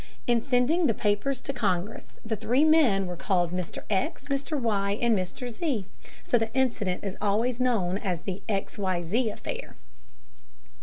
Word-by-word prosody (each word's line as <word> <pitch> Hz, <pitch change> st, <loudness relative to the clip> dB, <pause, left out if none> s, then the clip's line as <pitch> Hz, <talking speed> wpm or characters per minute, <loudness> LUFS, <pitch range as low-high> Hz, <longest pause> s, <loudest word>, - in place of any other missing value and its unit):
In 240 Hz, -1 st, +3 dB
sending 275 Hz, +7 st, +2 dB
the 225 Hz, -, +1 dB
papers 215 Hz, +6 st, 0 dB
to 275 Hz, -, -3 dB
Congress, 200 Hz, -4 st, -2 dB
the 220 Hz, 0 st, -1 dB
three 245 Hz, +7 st, +2 dB
men 280 Hz, -12 st, +5 dB
were 180 Hz, -1 st, -4 dB
called 175 Hz, -1 st, +1 dB
Mr. 180 Hz, -1 st, -4 dB
X., 280 Hz, -, -1 dB
Mr. 280 Hz, +2 st, -1 dB
Y., 205 Hz, -4 st, 0 dB
and 235 Hz, -2 st, +3 dB
Mr. 195 Hz, +6 st, -3 dB
Z., 240 Hz, -, -1 dB, 0.4 s
so 240 Hz, -, +2 dB
the 225 Hz, 0 st, -1 dB
incident 230 Hz, -8 st, 0 dB
is 195 Hz, -1 st, -4 dB
always 225 Hz, +4 st, +1 dB
known 205 Hz, -7 st, +1 dB
as 180 Hz, -6 st, -2 dB
the 195 Hz, 0 st, -5 dB
"X.Y.Z. 195 Hz, +2 st, 0 dB
Affair." -, -, -6 dB
220 Hz, 155 wpm, -27 LUFS, 195-255 Hz, 0.4 s, men